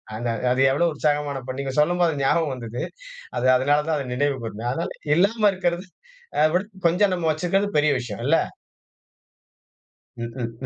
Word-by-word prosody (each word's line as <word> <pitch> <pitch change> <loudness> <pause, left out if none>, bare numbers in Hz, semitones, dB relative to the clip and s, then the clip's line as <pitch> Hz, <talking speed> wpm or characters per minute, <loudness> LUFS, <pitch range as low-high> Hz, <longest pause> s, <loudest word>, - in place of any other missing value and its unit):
அந்த 120 +2 -3 0.2
அது 130 +1 +2
எவ்வளவு 165 +5 +2
உற்சாகமான 145 -2 0
பாடல் 130 +1 -5
நீங்க 135 -1 -4
சொல்லும்போது 175 +2 +3
அது 140 - -2
ஞாபகம் 150 +1 +2
வந்தது. 120 -1 -5 0.5
அது - - +1
அதனால 145 +3 +2
தான் 160 -1 +1
அதை 140 -3 -4
நினைவு 140 +2 0
கூர்ந்தேன். 115 +1 -4
அதனால, 165 +6 -2 0.3
இல்லாம 205 +4 +3
இருக்கிறது 180 0 -1 0.5
அதைவிட 155 +5 +3 0.2
கொஞ்சம் 190 +4 +3
நம்ம 175 -3 -1
வச்சிருக்கிறது 180 +6 0
பெரிய 150 0 +3
விஷயம் 110 -5 -6
இல்ல? - - +4 1.8
ம்ஹ்ம். 115 0 -4
150 Hz, 150 wpm, -23 LUFS, 130-175 Hz, 1.8 s, இல்ல